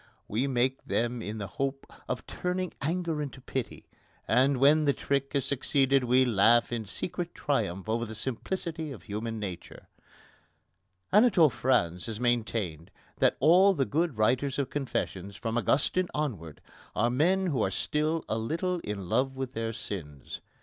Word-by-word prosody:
We 120 +7 0
make 130 0 0
them 120 +1 -1
in 110 0 -5
the 105 - -4
hope 135 +6 -3 0.2
of - - -3
turning 180 0 -3
anger 165 0 -1
into 140 -2 -6
pity, 130 -1 -5 0.4
and 130 +4 +3
when 150 +4 +5
the 140 - +4
trick 140 0 -1
has 140 -3 +1
succeeded 135 -1 +2
we 130 +2 +4
laugh 115 +1 +4
in 115 -2 -2
secret 175 - -5
triumph 105 -9 -1
over 115 +2 0
the 110 - -6
simplicity 160 - -3
of 125 - -9
human 110 +2 -4
nature. 95 -4 -7 1.2
Anatole 195 - +6
France 110 -8 +1
has 110 -1 -5
maintained 110 -9 -1 0.3
that - - +3
all 185 +7 +6
the 135 - +1
good 160 -3 0
writers 130 +5 +1
of 135 -2 -2
confessions, 100 -8 -3
from 115 0 -3
Augustine 145 +9 +2
onwards, 100 - -3 0.3
are 120 +2 +2
men 180 +9 +2
who 140 -10 0
are 95 - +2
still 155 - -1
a 110 - -1
little 170 +10 -1
in 100 - -5
love 135 +7 +1
with 130 -1 -4
their 115 0 -2
sins. 75 - -7
130 Hz, 155 wpm, -29 LUFS, 110-150 Hz, 1.2 s, Anatole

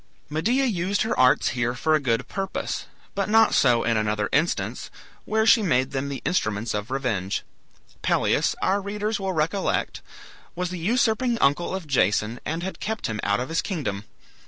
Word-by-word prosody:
Medea 235 - +1
used 195 -3 0
her 220 - -1
arts 130 0 +4
here 120 0 -1
for 155 +5 +1
a 155 - +4
good 125 -2 0
purpose, 195 -1 -4 0.3
but 200 0 -1
not 225 +1 +5
so 120 -3 +4
in 115 -1 +1
another 105 -1 0
instance, 155 +4 0 0.4
where 220 0 +1
she 225 +1 +6
made 130 -9 +1
them 140 +1 -2
the 140 - -6
instruments 110 - 0
of 105 +2 -3
revenge. 115 -8 -2 0.6
Pelias, - - +1
our 200 +2 +2
readers 210 +2 -2
will 190 -1 -2
recollect, 165 +5 -1 0.5
was 180 0 -2
the 180 - -5
usurping 235 +5 +1
uncle 160 +3 +1
of 190 -3 -5
Jason, 115 -4 +1
and 165 +3 -2
had 190 - -5
kept 220 0 -3
him 110 -1 -3
out 100 0 +1
of 125 - -4
his 165 - +1
kingdom. 115 - -4
160 Hz, 175 wpm, -24 LUFS, 120-200 Hz, 0.6 s, she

